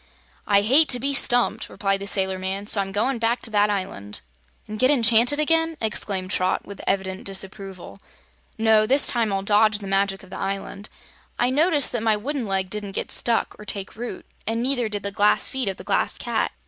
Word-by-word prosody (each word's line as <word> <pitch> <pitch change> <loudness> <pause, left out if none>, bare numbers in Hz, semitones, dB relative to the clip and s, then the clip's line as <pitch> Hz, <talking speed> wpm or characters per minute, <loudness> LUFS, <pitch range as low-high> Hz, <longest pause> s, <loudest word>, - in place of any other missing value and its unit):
"I 200 -1 +4
hate 270 +9 +4
to 250 - +3
be 280 +3 -1
stumped," 245 -2 +2
replied 195 -2 -1
the 200 - -5
sailor 190 -1 +1
man; 190 +2 -4
"so 205 -1 +4
I'm 195 0 -5
goin' 230 +5 -1
back 230 +2 0
to 225 - 0
that 210 0 +3
island." 185 - -4 0.5
"And 215 0 -7
get 255 - +4
enchanted 240 +1 +4
again?" 325 +1 +1
exclaimed 200 -3 -2
Trot, 185 -2 0
with 200 0 -9
evident 190 -1 -1
disapproval. 195 -1 -5 0.6
"No; 220 -1 +3
this 275 +4 +3
time 230 -5 +1
I'll 195 0 -1
dodge 210 +1 +3
the 205 - -10
magic 195 0 0
of 190 - -16
the - - -7
island. 195 +1 -5 0.5
I 245 +1 +1
noticed 300 0 +2
that 240 - -2
my 220 -1 +2
wooden 260 +2 -4
leg 190 -1 -1
didn't 210 -2 -5
get - - -3
stuck, 235 -1 +1
or - - -9
take 200 -1 -4
root, 230 -3 -7 0.2
an' 230 +1 -1
neither 250 -3 0
did 205 -1 -5
the 200 - -2
glass 205 +1 +3
feet 265 -3 -3
of 195 -1 -2
the - - -10
Glass - - 0
Cat. - - -2
210 Hz, 205 wpm, -23 LUFS, 195-240 Hz, 0.6 s, I